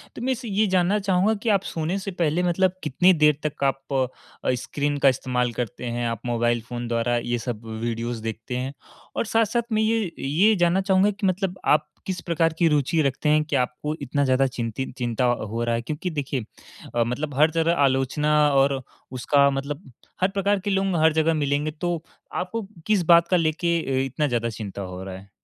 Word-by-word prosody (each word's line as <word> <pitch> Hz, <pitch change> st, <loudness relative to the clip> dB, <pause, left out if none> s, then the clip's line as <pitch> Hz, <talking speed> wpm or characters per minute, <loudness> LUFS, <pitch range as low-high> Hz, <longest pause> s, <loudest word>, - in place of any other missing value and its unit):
तो -, -, -7 dB
मैं 260 Hz, +2 st, 0 dB
इस 250 Hz, -, -2 dB
ये 210 Hz, 0 st, +1 dB
जानना 185 Hz, +4 st, +3 dB
चाहूँगा 195 Hz, +2 st, +2 dB
कि 230 Hz, -, +1 dB
आप 195 Hz, -2 st, +3 dB
सोने 165 Hz, +4 st, -2 dB
से 195 Hz, 0 st, -5 dB
पहले 175 Hz, -1 st, 0 dB
मतलब 180 Hz, +1 st, +2 dB
कितनी 175 Hz, +6 st, +4 dB
देर 150 Hz, -1 st, +5 dB
तक 150 Hz, -2 st, -3 dB
आप 135 Hz, 0 st, +1 dB, 0.6 s
अ, -, -, +3 dB
स्क्रीन 145 Hz, +3 st, -2 dB
का -, -, +9 dB
इस्तेमाल 125 Hz, -1 st, -1 dB
करते 125 Hz, +1 st, -4 dB
हैं, 120 Hz, 0 st, -2 dB
आप 115 Hz, -1 st, -4 dB
मोबाइल 120 Hz, 0 st, +1 dB
फ़ोन 120 Hz, -1 st, -4 dB
द्वारा 120 Hz, +1 st, 0 dB
ये 120 Hz, +1 st, -1 dB
सब 115 Hz, -1 st, -4 dB
वीडियोज़ 115 Hz, +1 st, -3 dB
देखते 115 Hz, +2 st, -4 dB
हैं 130 Hz, +2 st, -3 dB, 0.4 s
और -, -, 0 dB
साथ-साथ 230 Hz, +2 st, 0 dB
मैं 215 Hz, 0 st, +2 dB
ये 220 Hz, -4 st, +1 dB
ये 185 Hz, +11 st, +3 dB
जानना 175 Hz, +1 st, +2 dB
चाहूँगा 190 Hz, +1 st, +3 dB
कि 200 Hz, -1 st, -2 dB
मतलब 185 Hz, 0 st, -1 dB
आप 150 Hz, 0 st, +3 dB, 0.2 s
किस 185 Hz, -2 st, -3 dB
प्रकार 165 Hz, -1 st, +1 dB
की 170 Hz, -, +4 dB
रुचि 150 Hz, +2 st, +2 dB
रखते 140 Hz, +2 st, 0 dB
हैं 155 Hz, 0 st, +4 dB
कि 150 Hz, -, -3 dB
आपको 125 Hz, +4 st, -1 dB
इतना 140 Hz, +1 st, 0 dB
ज़्यादा 130 Hz, +1 st, +3 dB
चिंतित 120 Hz, +1 st, -4 dB
चिंता 120 Hz, 0 st, 0 dB
हो 115 Hz, -1 st, -1 dB
रहा 120 Hz, 0 st, +1 dB
है 115 Hz, -, -1 dB
क्योंकि 150 Hz, +8 st, -4 dB
देखिए, 140 Hz, -4 st, -3 dB, 0.6 s
मतलब 125 Hz, +6 st, -1 dB
हर 155 Hz, +2 st, +5 dB
जगह 165 Hz, +1 st, +2 dB
आलोचना 135 Hz, +3 st, +1 dB, 0.2 s
और 135 Hz, -1 st, +3 dB, 0.3 s
उसका 140 Hz, +2 st, +3 dB
मतलब 140 Hz, +1 st, -4 dB, 0.3 s
हर 185 Hz, -, +5 dB
प्रकार 200 Hz, 0 st, +1 dB
के -, -, 0 dB
लोग 195 Hz, -2 st, +1 dB
हर 160 Hz, -1 st, +5 dB
जगह 160 Hz, +1 st, +2 dB
मिलेंगे 145 Hz, 0 st, 0 dB
तो 170 Hz, +1 st, -3 dB, 0.3 s
आपको 195 Hz, +3 st, -3 dB, 0.2 s
किस 205 Hz, -4 st, +3 dB
बात 170 Hz, 0 st, +6 dB
का 180 Hz, -, +3 dB
लेके 170 Hz, +1 st, +1 dB, 0.3 s
इतना 135 Hz, +3 st, -1 dB
ज़्यादा 120 Hz, -3 st, -1 dB
चिंता 105 Hz, -3 st, -6 dB
हो 90 Hz, 0 st, -6 dB
रहा 95 Hz, -1 st, -7 dB
है। 95 Hz, +1 st, -12 dB
150 Hz, 200 wpm, -24 LUFS, 125-180 Hz, 0.6 s, का